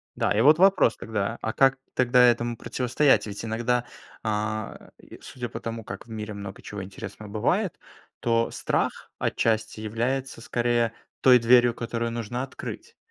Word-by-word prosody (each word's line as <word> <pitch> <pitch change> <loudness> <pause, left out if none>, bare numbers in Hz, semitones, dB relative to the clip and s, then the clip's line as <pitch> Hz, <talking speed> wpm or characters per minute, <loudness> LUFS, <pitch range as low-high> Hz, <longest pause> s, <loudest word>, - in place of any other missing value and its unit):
Да, - - 0
и - - +4
вот 150 +4 +7
вопрос 190 -11 +5
тогда, 110 0 -3
а 110 - -2
как 135 0 +4 0.2
тогда 125 0 +4
этому 120 -1 +2
противостоять? 125 +2 +2
Ведь 100 +2 -6
иногда, 120 +2 0 0.4
э, 110 0 -3
и - - -14
судя 125 -2 -6
по - - -6
тому, 115 -1 -5
как 95 +3 -7
в - - -21
мире 105 -1 -5
много 100 -1 -8
чего 100 -2 -7
интересного 100 +2 -9
бывает, 170 - 0 0.4
то 115 -1 +1
страх - - -2
отчасти 110 -1 0
является, 120 +4 -2
скорее, 120 -1 +1 0.3
той 125 -2 +7
дверью, 120 0 +5
которую 115 0 -3
нужно 120 +2 -3
открыть. 460 - -8
115 Hz, 155 wpm, -26 LUFS, 110-125 Hz, 0.4 s, вот